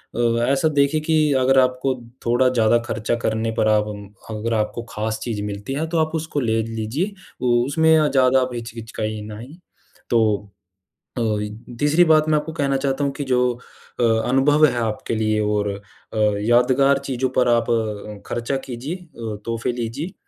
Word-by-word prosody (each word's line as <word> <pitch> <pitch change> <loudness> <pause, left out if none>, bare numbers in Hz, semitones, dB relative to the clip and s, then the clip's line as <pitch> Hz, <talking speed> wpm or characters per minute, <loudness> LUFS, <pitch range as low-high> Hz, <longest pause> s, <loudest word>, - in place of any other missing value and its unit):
अ, 115 0 +1
ऐसा 140 +3 +2
देखिए 145 +1 +2
कि 160 +1 +1 0.2
अगर 135 +1 +4
आपको 130 +1 +1 0.3
थोड़ा 120 +2 +3
ज़्यादा 120 -2 +3
खर्चा 110 +1 -1
करने 110 +1 0
पर 110 - +3
आप 105 0 +3 0.4
अगर 110 +2 -2
आपको 110 +2 -2
ख़ास 110 +1 -3
चीज़ 110 -4 -3
मिलती 105 +4 -5
है, 150 +4 -1
तो 165 +1 -2
आप 155 - -6
उसको 160 -2 -2
ले 115 -3 +1
लीजिए, 115 - -3 0.3
वो 120 -1 +3
उसमें 160 +3 +3 0.2
ज़्यादा 130 -1 +4
आप 130 0 -2
हिचकिचकाइनई। 110 +2 -6 0.5
तो 105 -3 +1 0.6
अ, - - 0 0.6
तीसरी 150 +4 +4
बात 155 0 +4
मैं 155 - +4
आपको 155 +2 -7
कहना 140 -2 +1
चाहता 135 +1 -1
हूँ 140 - 0
कि 145 - -4
जो 125 0 +3 0.5
अ, - - +3 0.3
अनुभव 145 +4 +4
है 130 - -2
आपके 110 +1 -3
लिए 110 -1 +1
और 105 -1 0
अ, 100 0 -5 0.6
यादगार 125 +5 +4
चीज़ों 130 -1 -1
पर 125 -1 +4
आप 120 -1 +2
अ, 105 -2 -3
खर्चा 120 +3 -2
कीजिए, 130 +6 -5
अ, 120 - -8
तोहफ़े 115 +1 -2
लीजिए 125 +9 -4
120 Hz, 165 wpm, -21 LUFS, 110-140 Hz, 0.6 s, अगर